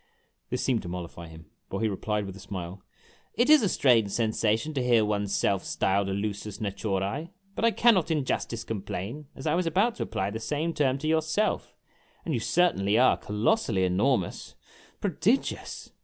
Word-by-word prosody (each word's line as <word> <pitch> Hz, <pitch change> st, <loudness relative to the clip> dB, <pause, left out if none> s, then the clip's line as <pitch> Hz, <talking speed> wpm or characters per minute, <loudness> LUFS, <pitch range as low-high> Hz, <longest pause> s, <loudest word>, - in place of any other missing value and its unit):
This 125 Hz, -, -2 dB
seemed 125 Hz, -4 st, +1 dB
to 90 Hz, -, -8 dB
mollify 85 Hz, -1 st, -7 dB
him, 80 Hz, -1 st, -14 dB, 0.2 s
for 95 Hz, -, -3 dB
he 110 Hz, -, +1 dB
replied, 105 Hz, +1 st, -2 dB
with 95 Hz, -1 st, -7 dB
a -, -, -11 dB
smile, 95 Hz, -1 st, -7 dB, 0.3 s
" -, -, -32 dB
It 240 Hz, +6 st, +3 dB
is 310 Hz, -, +8 dB
a 205 Hz, -, +2 dB
strange 115 Hz, -, +3 dB
sensation 110 Hz, +5 st, 0 dB
to 135 Hz, -, -1 dB
hear 120 Hz, -3 st, +4 dB
one's 105 Hz, -1 st, -1 dB
self 95 Hz, -2 st, +1 dB
styled 95 Hz, +5 st, 0 dB
a 95 Hz, -, -1 dB
Ius2ts 105 Hz, 0 st, -4 dB
natiirce, 100 Hz, -, -2 dB, 0.2 s
but -, -, -4 dB
I 230 Hz, -, +6 dB
cannot 225 Hz, -7 st, +3 dB
in 150 Hz, -4 st, 0 dB
justice 115 Hz, -2 st, -2 dB
complain, 110 Hz, +6 st, -5 dB
as 135 Hz, -, -9 dB
I 155 Hz, -, +2 dB
was 175 Hz, 0 st, +1 dB
about 200 Hz, +9 st, +2 dB
to -, -, -1 dB
apply 95 Hz, +1 st, -2 dB
the 110 Hz, -, -4 dB
same 150 Hz, +8 st, -2 dB
term 135 Hz, -4 st, +1 dB
to 150 Hz, +3 st, -4 dB
yourself; 160 Hz, +6 st, 0 dB, 0.5 s
and 165 Hz, -, -1 dB
you 120 Hz, -, +1 dB
certainly 110 Hz, -, +2 dB
are 130 Hz, +2 st, +5 dB
colbssally 105 Hz, -, +1 dB
enormous 95 Hz, +2 st, 0 dB, 0.5 s
pro 200 Hz, -, 0 dB
digious 225 Hz, -, -1 dB
110 Hz, 185 wpm, -27 LUFS, 100-155 Hz, 0.5 s, is